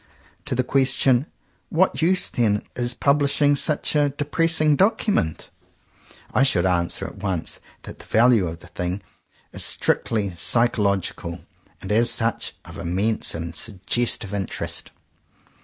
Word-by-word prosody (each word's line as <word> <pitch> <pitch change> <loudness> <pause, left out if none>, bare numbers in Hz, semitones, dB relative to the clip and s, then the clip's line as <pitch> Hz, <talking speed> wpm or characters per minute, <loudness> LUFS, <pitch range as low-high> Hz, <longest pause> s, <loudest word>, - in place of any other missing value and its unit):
To - - -2
the 130 - +1
question 130 +1 +2 0.4
"what 180 +1 +1
use 180 +2 +3
then 105 -4 0
in 120 -1 -1
pub 145 +1 +3
lishing 145 0 +2
such 150 +2 0
a 145 -1 +3
depressing 155 +2 +1
document?" 195 - 0 0.8
I - - +3
should 130 -10 +3
answer 85 -2 0
at - - -9
once 95 -5 -3 0.2
that - - -10
the - - -13
value 115 -4 +3
of 80 +1 -7
the - - -14
thing 90 +2 -4 0.5
is - - -2
strictly 105 -5 0
psychological, 100 -4 0 0.4
and, 95 - -5
as 115 +3 +4
such, 115 -1 0
of - - -10
immense 100 +6 -1
and 85 0 -6
suggestive 105 +2 -2
interest. 100 -2 -4
115 Hz, 135 wpm, -22 LUFS, 95-140 Hz, 0.8 s, as